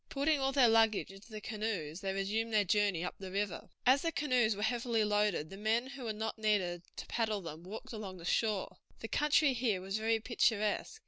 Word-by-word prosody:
Putting 285 Hz, +2 st, +1 dB
all 270 Hz, 0 st, +1 dB
their 270 Hz, -3 st, +5 dB
luggage 225 Hz, -3 st, +3 dB
into 195 Hz, +4 st, -14 dB
the 215 Hz, -, -6 dB
canoes 205 Hz, -7 st, -4 dB
they 195 Hz, -, -1 dB
resumed 210 Hz, +4 st, -1 dB
their 215 Hz, -1 st, +4 dB
journey 200 Hz, -3 st, +1 dB
up 180 Hz, -, -3 dB
the 190 Hz, -1 st, -7 dB
river. 200 Hz, -1 st, -3 dB, 0.2 s
As 260 Hz, +2 st, +5 dB
the 330 Hz, -, 0 dB
canoes 250 Hz, -8 st, +2 dB
were 205 Hz, -, -4 dB
heavily 235 Hz, 0 st, +1 dB
loaded 210 Hz, -6 st, +1 dB
the 195 Hz, -, -8 dB
men 220 Hz, +4 st, +1 dB
who 275 Hz, -3 st, -8 dB
were 225 Hz, -, -1 dB
not 220 Hz, +1 st, -4 dB
needed 195 Hz, -5 st, +1 dB
to -, -, -6 dB
paddle 220 Hz, -3 st, -1 dB
them 165 Hz, -2 st, -8 dB
walked 220 Hz, +7 st, -8 dB
along 200 Hz, -4 st, -6 dB
the 170 Hz, -, -10 dB
shore. 210 Hz, +1 st, 0 dB, 0.2 s
The 225 Hz, -, -4 dB
country 295 Hz, +1 st, +3 dB
here 230 Hz, -6 st, 0 dB
was 195 Hz, +3 st, -3 dB
very 225 Hz, +1 st, +1 dB
picturesque. 220 Hz, -2 st, 0 dB
215 Hz, 210 wpm, -33 LUFS, 195-235 Hz, 0.2 s, their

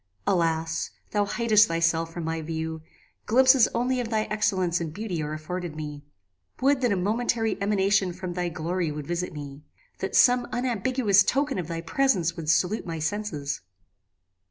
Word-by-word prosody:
Alas! 165 Hz, -3 st, 0 dB, 0.2 s
thou 205 Hz, -1 st, +1 dB
hidest 215 Hz, 0 st, +4 dB
thyself 165 Hz, 0 st, +1 dB
from 170 Hz, 0 st, -5 dB
my 160 Hz, 0 st, -2 dB
view: 160 Hz, 0 st, -4 dB, 0.5 s
glimpses 260 Hz, +1 st, +6 dB
only 250 Hz, +2 st, -1 dB
of 240 Hz, -2 st, -3 dB
thy 220 Hz, -1 st, +1 dB
excellence 185 Hz, -5 st, +1 dB
and 160 Hz, -2 st, -3 dB
beauty 195 Hz, -6 st, -3 dB
are 150 Hz, 0 st, -3 dB
afforded 170 Hz, +1 st, -5 dB
me. 150 Hz, -2 st, -6 dB, 0.6 s
Would 275 Hz, 0 st, +2 dB
that 245 Hz, -3 st, +2 dB
a -, -, +2 dB
momentary 225 Hz, +4 st, 0 dB
emanation 200 Hz, -2 st, +2 dB
from 180 Hz, 0 st, -6 dB
thy 175 Hz, 0 st, -2 dB
glory 170 Hz, +1 st, -2 dB
would 150 Hz, -1 st, -6 dB
visit 175 Hz, +3 st, -3 dB
me! 145 Hz, -2 st, -8 dB, 0.4 s
that -, -, -3 dB
some 245 Hz, -1 st, +5 dB
unambiguous 245 Hz, -3 st, +2 dB
token 275 Hz, +3 st, 0 dB
of 170 Hz, -, -4 dB
thy 165 Hz, -1 st, -4 dB
presence 180 Hz, -5 st, +1 dB
would 160 Hz, -3 st, -5 dB
salute 185 Hz, +5 st, +1 dB
my 165 Hz, -1 st, -4 dB
senses! 160 Hz, -5 st, -3 dB
180 Hz, 160 wpm, -26 LUFS, 165-220 Hz, 0.6 s, glimpses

